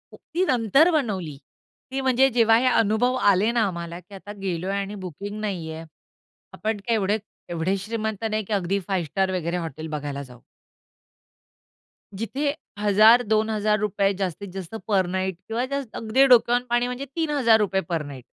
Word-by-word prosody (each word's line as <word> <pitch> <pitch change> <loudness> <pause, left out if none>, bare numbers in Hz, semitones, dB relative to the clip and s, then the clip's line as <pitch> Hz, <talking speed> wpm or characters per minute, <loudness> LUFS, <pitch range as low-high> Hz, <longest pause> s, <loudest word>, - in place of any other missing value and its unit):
ती 345 +4 -3
नंतर 260 - +4
बनवली, 195 - -1 0.5
ती 270 +1 -2
म्हणजे 265 0 +4
जेव्हा 225 -1 +5
हे 245 - +1
अनुभव 240 +1 +2 0.2
आले 200 +4 +2
ना, 235 -1 +1
आम्हाला 170 -2 -6
की 200 +3 -18
आता 205 +2 -9
गेलोय 185 0 -2
आणि 200 +1 -4
बुकिंग 200 +5 -7
नाहीये. 165 -6 -4 0.7
आपण 220 0 -2
काय 220 +4 -2
एवढे 205 0 +1 0.3
एवढे 175 +3 0
श्रीमंत 220 +1 -4
नाही 215 0 -1
की 215 - -4
अगदी 195 0 0
फाइव्ह 185 -5 -1
स्टार 190 -1 +1
वगैरे 175 0 -2
हॉटेल 160 -2 -5
बघायला 140 -1 -5
जाऊ. 125 -3 -15 1.7
जिथे 270 +8 -2 0.3
₹1,000-2,000 215 -1 +3
जास्तीत-जास्त 190 0 -5
पर 195 -3 +2
नाईट 190 -1 -1
किंवा 225 +2 -1 0.4
अगदी 225 +5 +3
डोक्यावरून 245 -1 +4
पाणी 240 0 +1
म्हणजे 250 +2 -4
₹3,000 230 - +2
पर 165 -3 -1
नाईट 135 -4 -9
205 Hz, 145 wpm, -24 LUFS, 185-230 Hz, 1.7 s, जेव्हा